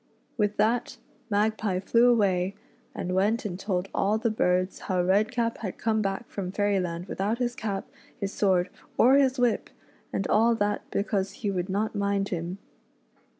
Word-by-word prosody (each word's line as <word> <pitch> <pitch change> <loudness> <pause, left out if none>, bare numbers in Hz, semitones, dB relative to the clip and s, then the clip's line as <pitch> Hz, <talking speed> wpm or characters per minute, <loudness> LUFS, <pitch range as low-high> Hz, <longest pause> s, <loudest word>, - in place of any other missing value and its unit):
With 210 -2 0
that 230 +3 +1 0.3
Magpie 210 -2 +1
flevv'.a'svay,:^i3(j*\\'eflt'«a*n*e? 195 -1 +1
"t^^ 190 -1 -2
all 205 +2 +2
the 230 0 0
birds 185 -2 +1
how 185 -2 0
Redcap 220 +5 +1
had 195 -5 -5
come 220 -1 +1
back 195 +3 -2
from 185 -3 -5
Fairy 205 0 +1
land 175 -1 -3
without 200 +4 -1
his 245 -1 -1
cap, 200 -3 -3 0.3
his 200 0 -3
sword, 185 -2 +2 0.3
or 255 +3 +6
his 275 -1 +4
whip, 245 -2 +1 0.4
and 195 - -1
all 230 +2 +4
that 205 -1 0
because 200 -1 -1
he 200 - +2
would 180 0 -2
not 205 +3 -1
mind 200 -1 0
him. 175 +1 -3
200 Hz, 150 wpm, -27 LUFS, 190-220 Hz, 0.4 s, or